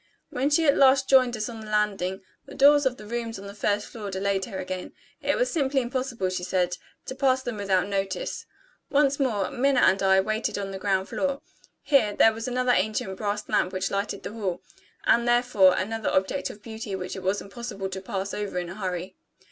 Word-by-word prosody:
When 265 +3 0
she 320 +2 +3
at 285 - +5
last 270 0 +5
joined 255 -3 +4
us 215 - -2
on 230 -2 -7
the 215 - -9
landing, 200 -3 0 0.2
the - - -10
doors 285 0 +6
of 250 -1 -2
the 210 - -11
rooms 230 0 -4
on 195 - -10
the 200 - -8
first 205 0 0
floor 210 -3 -7
delayed 195 0 -1
her 190 - -7
again: 185 0 -5 0.3
it - - +1
was - - +1
simply 280 -4 +1
impossible, 245 -5 -2
she 185 -1 -3
said, 180 -1 0 0.3
to - - -5
pass 260 -1 +2
them 245 -4 -4
without 195 -2 +1
notice. 195 -2 -3 0.4
Once 280 -1 +2
more, 215 -8 0
Minna 270 0 +2
and 190 +1 +4
I 190 0 +5
waited 215 +3 -1
on 195 -1 -4
the 190 - -6
ground 190 -1 0
floor. 280 -1 -2 0.4
Here, 225 -8 +3
there 225 - +5
was 225 +2 -5
another 250 0 +1
ancient 210 -2 0
brass 205 +1 -3
lamp 185 - +1
which 185 0 -2
lighted 200 0 -2
the - - -6
hall; 195 -6 -3 0.4
and, 235 0 +3
therefore, 240 -6 +4
another 225 +2 -2
object 190 +9 0
of 210 - -11
beauty 220 -3 -5
which 185 -1 -5
it 190 - -6
was 190 +2 0
impossible 200 -2 -6
to 190 0 -6
pass 195 +1 -4
over 205 -3 -3
in 175 -1 -3
a 185 - -7
hurry. 185 -2 -4
210 Hz, 210 wpm, -26 LUFS, 190-250 Hz, 0.4 s, doors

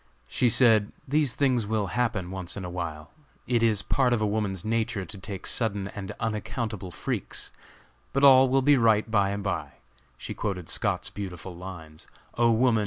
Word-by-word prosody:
She 120 - +2
said, 110 -4 +5 0.2
"these 145 -1 +1
things 125 -6 +1
will 110 -1 0
happen 110 -7 -1
once 95 -1 -4
in 95 - -5
a 90 - -6
while; 80 -3 -5 0.3
it 120 -2 +1
is 110 -3 +2
part 125 +3 +2
of 120 - +1
a 110 - +1
woman's 100 -3 -2
nature 110 -2 -1
to 105 - -10
take 95 0 -7
sudden 100 -4 0
and 100 -2 -7
unaccountable 110 -2 -3
freaks; 85 - -4 0.6
but 135 - 0
all 130 -1 +8
will 135 +1 +2
be 145 +1 +5
right 110 -2 +3
by 100 -3 +3
and 100 0 -3
by." 100 - -3 0.4
She - - -6
quoted 90 -5 -4
Scott's - - -2
beautiful 95 -2 -7
lines: 85 -4 -10 0.3
"O 120 0 +3
Woman! 115 0 +3
105 Hz, 175 wpm, -27 LUFS, 95-120 Hz, 0.6 s, all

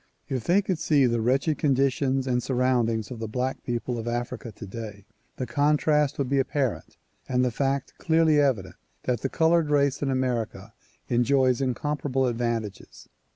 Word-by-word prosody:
If 130 -4 -3
they 195 +4 +3
could 185 -4 -2
see 145 -5 +3
the 120 -2 +1
wretched 135 +6 +1
conditions 135 -1 +1
and 125 -2 0
surroundings 120 -4 0
of 120 - -6
the 110 - -4
black 125 +4 -2
people 120 0 -3
of 115 - -6
Africa 120 0 -3
today, 105 -1 -8 0.3
the 130 - -3
contrast 150 +3 +2
would 140 - -1
be 140 +1 +1
apparent 135 -2 -2 0.3
and 125 0 +2
the 125 - 0
fact 135 +2 -1
clearly 160 -2 +3
evident 110 -11 0 0.3
that 125 -3 -1
the 135 - -1
colored 165 0 +2
race 140 -2 +2
in 140 - 0
America 115 -5 -2 0.3
enjoys 130 +1 +2
incomparable 135 +1 -1
advantages. 115 -4 -3
130 Hz, 155 wpm, -26 LUFS, 120-140 Hz, 0.3 s, they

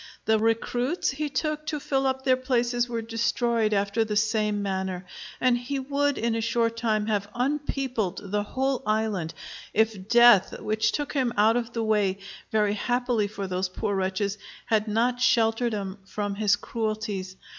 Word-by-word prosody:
The 220 0 +3
recruits 240 +7 0
he 300 +2 -3
took 305 +2 -2
to 300 -2 -2
fill 270 -1 0
up 265 0 -1
their 260 -1 +4
places 245 -1 0
were 230 -1 -3
destroyed 230 0 0
after 200 +2 +1
the 215 -1 -3
same 215 -1 +1
manner; 190 -2 -3 0.3
and 250 -1 +3
he 245 +3 -3
would 285 +1 0
in 230 0 0
a 225 - -1
short 230 0 +1
time 220 -2 0
have 205 -2 -1
unpeopled 250 -7 -2
the 210 0 +1
whole 265 +5 -1
island 215 -6 -1 0.4
if 215 -3 +1
death, 235 -5 +6
which 215 0 0
took 290 -1 -3
him 260 -4 +1
out 215 +2 +5
of 235 -1 -2
the 230 - -1
way, 205 -3 +1 0.3
very 210 -2 +2
happily 245 -1 0
for 200 -1 -5
those 185 0 -2
poor 200 +2 -2
wretches, 195 +2 -1 0.3
had 220 -3 +1
not 240 +3 +1
sheltered 235 -1 +2
'em 195 -1 -5
from 205 +1 -3
his 205 0 +2
cruelties. 215 -4 -3
225 Hz, 165 wpm, -26 LUFS, 205-245 Hz, 0.4 s, death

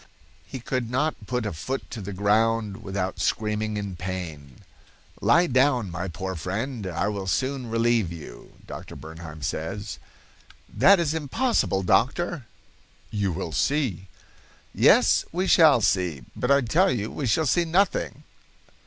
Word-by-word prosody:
"He 130 - -6
could 125 -1 -3
not 130 -4 -1
put 125 -2 -1
a 105 - -3
foot 130 - -5
to 115 - -6
the 100 +1 -6
ground 105 +1 +1
without 95 -1 -3
screaming 110 0 -1
with 100 -4 -5
pain. 85 -8 -6 0.6
'Lie 170 +1 +5
down, 130 - +2
my 90 +2 -4
poor 95 +2 -5
friend; 100 - -4
I 90 +3 -1
will 100 -2 -3
soon 130 +5 -1
relieve 115 -4 +1
you.' 85 -3 -10
Dr. - - -9
Bernheim 80 -1 -10
says. 95 +7 -4 0.7
'That 200 -1 +6
is 160 -3 0
impossible, 160 - 0
doctor.' 130 - +1 0.6
'You 100 -2 0
will 85 -1 -4
see.' 120 - 0 0.7
'Yes, - - +5
we 180 +3 -1
shall 155 -9 +6
see, 90 - 0
but 125 - -2
I 140 0 +5
tell 170 +11 +3
you, 110 - -2
we 140 - -3
shall 160 +8 +2
see 175 +6 +3
nothing! 185 +5 0
110 Hz, 145 wpm, -25 LUFS, 95-135 Hz, 0.7 s, That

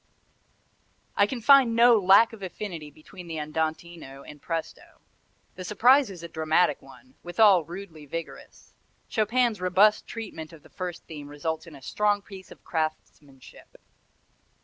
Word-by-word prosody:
I 200 - +3
can 245 +1 -5
find 265 -2 +5
"no 235 -1 +6
lack 200 +4 +5
of 220 - -12
affinity" 180 -5 -7
between 165 +5 -14
the 165 -1 -6
andantino 155 -2 -5
and 150 -1 -12
presto. 165 -1 -6 0.5
The 185 - -9
surprise 245 +7 +4
is 180 -4 -10
a - - -6
dramatic 160 +2 +1
one, 260 - -17
withal 185 0 +4
rudely 170 -3 -10
vigorous. 165 +3 -9 0.4
Chopin's 225 -1 0
robust 190 +4 +3
treatment 175 -8 -8
of 155 - -15
the - - -18
first 180 -3 -7
theme 150 -3 -9
results 160 +3 -5
in 160 - -12
a 135 - -15
strong 205 +3 0
piece 190 -2 -12
of - - -15
craftmanship. 155 -4 -6
180 Hz, 145 wpm, -26 LUFS, 160-210 Hz, 0.5 s, no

